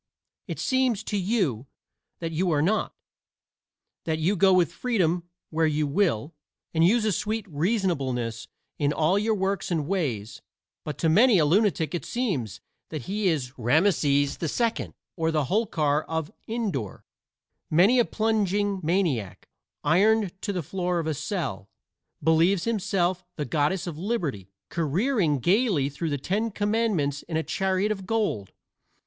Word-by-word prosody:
It -, -, -4 dB
seems 260 Hz, -5 st, +1 dB
to 215 Hz, -, -3 dB
you 180 Hz, -, 0 dB, 0.5 s
that 165 Hz, -1 st, -3 dB
you 175 Hz, +3 st, 0 dB
are 150 Hz, -3 st, +2 dB
not 215 Hz, +6 st, 0 dB, 1.1 s
that 160 Hz, -1 st, 0 dB
you 170 Hz, +6 st, +1 dB
go 190 Hz, +1 st, +5 dB
with 180 Hz, -2 st, +3 dB
freedom 180 Hz, -8 st, 0 dB, 0.2 s
where 160 Hz, 0 st, +2 dB
you 150 Hz, 0 st, +1 dB
will, 145 Hz, -, 0 dB, 0.4 s
and 160 Hz, 0 st, +3 dB
use 215 Hz, +6 st, +4 dB
a 215 Hz, -, +2 dB
sweet 215 Hz, +3 st, -2 dB
reasonableness 145 Hz, -, -1 dB, 0.3 s
in 145 Hz, -1 st, +1 dB
all 160 Hz, +6 st, +2 dB
your 220 Hz, +1 st, +1 dB
works 195 Hz, -1 st, -1 dB
and 160 Hz, -5 st, 0 dB
ways; 135 Hz, -, -2 dB, 0.4 s
but 150 Hz, -3 st, -5 dB
to 165 Hz, -, +1 dB
many 210 Hz, +7 st, +5 dB
a 155 Hz, -, +4 dB
lunatic 165 Hz, -3 st, +2 dB
it 170 Hz, -6 st, -2 dB
seems 175 Hz, -, -2 dB, 0.3 s
that 155 Hz, -5 st, -5 dB
he 205 Hz, -, -1 dB
is 135 Hz, -7 st, -1 dB
Rameses 145 Hz, -, +2 dB
II, 230 Hz, +8 st, -1 dB, 0.2 s
or 160 Hz, -2 st, 0 dB
the 155 Hz, -2 st, +1 dB
Holkar 155 Hz, -, +1 dB
of 160 Hz, -1 st, -3 dB, 0.2 s
Indore. 205 Hz, -, -3 dB, 0.6 s
Many 195 Hz, +11 st, +5 dB
a 240 Hz, -, +4 dB
plunging 205 Hz, -2 st, 0 dB
maniac, 155 Hz, -, -1 dB, 0.3 s
ironed 210 Hz, +2 st, +3 dB
to 205 Hz, -, -2 dB
the 180 Hz, -4 st, -3 dB
floor 180 Hz, +2 st, -2 dB
of 165 Hz, -, -1 dB
a 160 Hz, -, 0 dB
cell, 145 Hz, -, -4 dB, 0.5 s
believes 165 Hz, +3 st, +3 dB
himself 190 Hz, -5 st, 0 dB
the 150 Hz, -, -3 dB
Goddess 155 Hz, +6 st, 0 dB
of 165 Hz, -4 st, -6 dB
Liberty 165 Hz, -, -2 dB, 0.2 s
careering 170 Hz, -, +1 dB
gaily 175 Hz, -, +2 dB
through 155 Hz, +4 st, -4 dB
the 145 Hz, -, -1 dB
Ten 205 Hz, -, -1 dB
Commandments 205 Hz, -9 st, 0 dB
in 165 Hz, -2 st, -3 dB
a 160 Hz, -, 0 dB
chariot 190 Hz, +3 st, 0 dB
of 195 Hz, -3 st, -4 dB
gold. 205 Hz, -, -1 dB
175 Hz, 150 wpm, -26 LUFS, 150-205 Hz, 1.1 s, go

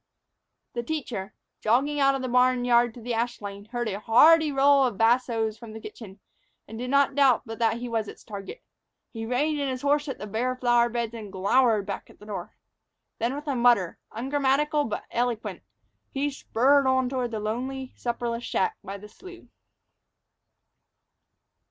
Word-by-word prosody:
THE 240 Hz, -, -2 dB
teacher, 235 Hz, -8 st, -5 dB, 0.2 s
jogging 275 Hz, +7 st, +1 dB
out 275 Hz, -1 st, +4 dB
of 265 Hz, -, -4 dB
the -, -, -1 dB
barn 250 Hz, 0 st, +3 dB
yard 240 Hz, -1 st, +4 dB
to 240 Hz, -, -10 dB
the 240 Hz, +1 st, -3 dB
ash 235 Hz, +1 st, -1 dB
lane, 200 Hz, 0 st, -8 dB
heard 240 Hz, +1 st, -3 dB
a 200 Hz, -1 st, -3 dB
hearty 305 Hz, +8 st, +6 dB
roll 275 Hz, 0 st, +5 dB
of 245 Hz, -6 st, 0 dB
bassos 225 Hz, -1 st, +1 dB
from 230 Hz, -3 st, -10 dB
the 220 Hz, -, -7 dB
kitchen, 210 Hz, -2 st, -11 dB, 0.5 s
and 225 Hz, +1 st, -8 dB
did 250 Hz, +1 st, -4 dB
not 280 Hz, 0 st, +3 dB
doubt 270 Hz, -4 st, +4 dB
but 225 Hz, 0 st, -8 dB
that 225 Hz, -1 st, +2 dB
he 245 Hz, +1 st, -5 dB
was 225 Hz, -2 st, -2 dB
its -, -, -11 dB
target. 205 Hz, -, -8 dB, 0.5 s
He 225 Hz, -1 st, -6 dB
reined 290 Hz, +5 st, 0 dB
in 280 Hz, -1 st, -1 dB
his 255 Hz, 0 st, -4 dB
horse 290 Hz, +1 st, +2 dB
at -, -, -4 dB
the -, -, -7 dB
bare 235 Hz, +5 st, -1 dB
flower 240 Hz, -1 st, +3 dB
beds 235 Hz, -1 st, -3 dB
and 215 Hz, -4 st, -8 dB
glowered 210 Hz, +2 st, +2 dB
back 200 Hz, -1 st, -6 dB
at -, -, -18 dB
the 210 Hz, -, -15 dB
door. 210 Hz, -2 st, -7 dB, 0.6 s
Then, 235 Hz, +4 st, 0 dB
with 295 Hz, +1 st, -7 dB
a 280 Hz, -, 0 dB
mutter, 235 Hz, -8 st, +3 dB
ungrammatical 285 Hz, +4 st, +1 dB
but 215 Hz, -, -4 dB
eloquent, 230 Hz, -5 st, -2 dB, 0.5 s
he 285 Hz, +2 st, -1 dB
spurred 275 Hz, +1 st, +2 dB
on 260 Hz, -1 st, +2 dB
toward 250 Hz, -1 st, -2 dB
the 220 Hz, -2 st, -4 dB
lonely, 255 Hz, +5 st, -4 dB
supperless 235 Hz, -1 st, -3 dB
shack 440 Hz, -, -1 dB
by 200 Hz, 0 st, -6 dB
the 210 Hz, +1 st, -12 dB
slough. 360 Hz, -, -13 dB
240 Hz, 180 wpm, -26 LUFS, 225-270 Hz, 0.6 s, hearty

